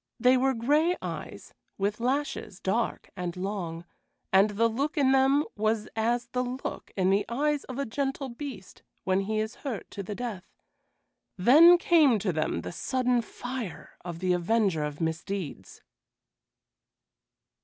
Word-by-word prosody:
They 250 Hz, +1 st, +5 dB
were 265 Hz, +1 st, +2 dB
gray 300 Hz, +9 st, +2 dB
eyes, -, -, -7 dB, 0.2 s
with 205 Hz, +2 st, -1 dB
lashes 255 Hz, -6 st, -2 dB
dark 225 Hz, +5 st, -2 dB
and 180 Hz, -1 st, -4 dB
long, 180 Hz, -3 st, -4 dB, 0.5 s
and 195 Hz, +2 st, +6 dB
the 215 Hz, +3 st, +2 dB
look 275 Hz, +8 st, -2 dB
in 270 Hz, -2 st, +4 dB
them 270 Hz, +2 st, +4 dB
was 215 Hz, 0 st, 0 dB
as 235 Hz, +2 st, 0 dB
the 250 Hz, 0 st, 0 dB
look 255 Hz, +2 st, -5 dB
in 190 Hz, 0 st, +3 dB
the 200 Hz, +1 st, +3 dB
eyes 290 Hz, +4 st, 0 dB
of 255 Hz, -, -7 dB
a 280 Hz, -, -1 dB
gentle 270 Hz, +3 st, -2 dB
beast 240 Hz, -5 st, -8 dB, 0.2 s
when 190 Hz, 0 st, +2 dB
he 215 Hz, +2 st, -2 dB
is 220 Hz, 0 st, -3 dB
hurt 255 Hz, -8 st, -5 dB
to 200 Hz, -, -5 dB
the 200 Hz, +2 st, -6 dB
death; 220 Hz, -7 st, -6 dB, 0.8 s
then 310 Hz, -, +8 dB
came 315 Hz, -9 st, +4 dB
to 190 Hz, -3 st, -1 dB
them 155 Hz, 0 st, -1 dB
the -, -, -6 dB
sudden 250 Hz, +5 st, 0 dB
fire 245 Hz, -3 st, -7 dB
of 170 Hz, -2 st, -6 dB
the 180 Hz, +1 st, +1 dB
avenger 180 Hz, -2 st, +1 dB
of 150 Hz, 0 st, -5 dB
misdeeds. 160 Hz, -, -4 dB
225 Hz, 150 wpm, -28 LUFS, 190-265 Hz, 0.8 s, then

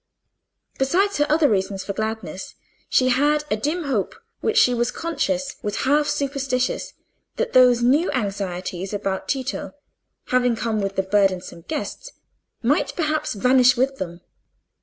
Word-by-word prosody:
Besides 375 Hz, +10 st, +2 dB
her 295 Hz, 0 st, +2 dB
other 305 Hz, 0 st, +4 dB
reasons 195 Hz, -3 st, -1 dB
for 200 Hz, -, -4 dB
gladness, 220 Hz, -2 st, -5 dB, 0.3 s
she 255 Hz, 0 st, +3 dB
had 295 Hz, +4 st, +2 dB
a -, -, +3 dB
dim 300 Hz, +11 st, -2 dB
hope, 255 Hz, -9 st, -1 dB, 0.2 s
which 445 Hz, 0 st, 0 dB
she 250 Hz, -, +5 dB
was 240 Hz, 0 st, 0 dB
conscious 285 Hz, -4 st, -2 dB
was 205 Hz, 0 st, -3 dB
half 295 Hz, +2 st, +3 dB
superstitious, 275 Hz, -3 st, -1 dB, 0.4 s
that 485 Hz, -, -2 dB
those 250 Hz, -2 st, +6 dB
new 290 Hz, +9 st, +3 dB
anxieties 195 Hz, -5 st, -3 dB
about 195 Hz, -2 st, -3 dB
Tito, 270 Hz, +1 st, -3 dB, 0.5 s
having 250 Hz, -1 st, +2 dB
come 220 Hz, -1 st, -1 dB
with 195 Hz, 0 st, -3 dB
the 190 Hz, -, +1 dB
burdensome 190 Hz, -3 st, 0 dB
guests, -, -, -5 dB, 0.5 s
might -, -, +1 dB
perhaps 305 Hz, -2 st, -1 dB
vanish 250 Hz, +3 st, +4 dB
with 270 Hz, +2 st, +1 dB
them. 175 Hz, -4 st, -6 dB
255 Hz, 140 wpm, -22 LUFS, 205-290 Hz, 0.5 s, those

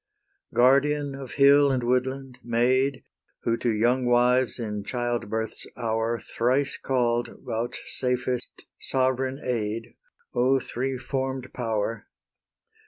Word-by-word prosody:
Guardian 140 Hz, +3 st, +3 dB
of 135 Hz, -2 st, -8 dB
hill 140 Hz, 0 st, +6 dB
and 130 Hz, -2 st, 0 dB
woodland, 130 Hz, +1 st, -1 dB
Maid, 130 Hz, +3 st, +1 dB, 0.4 s
Who 115 Hz, -, +2 dB
to 120 Hz, -, 0 dB
young 120 Hz, +4 st, +2 dB
wives 125 Hz, +1 st, +3 dB
in 105 Hz, -4 st, -4 dB
childbirth's 115 Hz, -2 st, -2 dB
hour 115 Hz, -1 st, 0 dB
Thrice 130 Hz, +5 st, 0 dB
call'd, 120 Hz, -2 st, 0 dB, 0.2 s
vouchsafest 125 Hz, +2 st, -3 dB, 0.2 s
sovereign 130 Hz, +1 st, 0 dB
aid, 115 Hz, -1 st, -2 dB, 0.4 s
O 130 Hz, +2 st, +3 dB
three 130 Hz, +1 st, -3 dB
form'd 130 Hz, 0 st, -3 dB
power! 115 Hz, -2 st, -2 dB
125 Hz, 105 wpm, -26 LUFS, 115-130 Hz, 0.4 s, hill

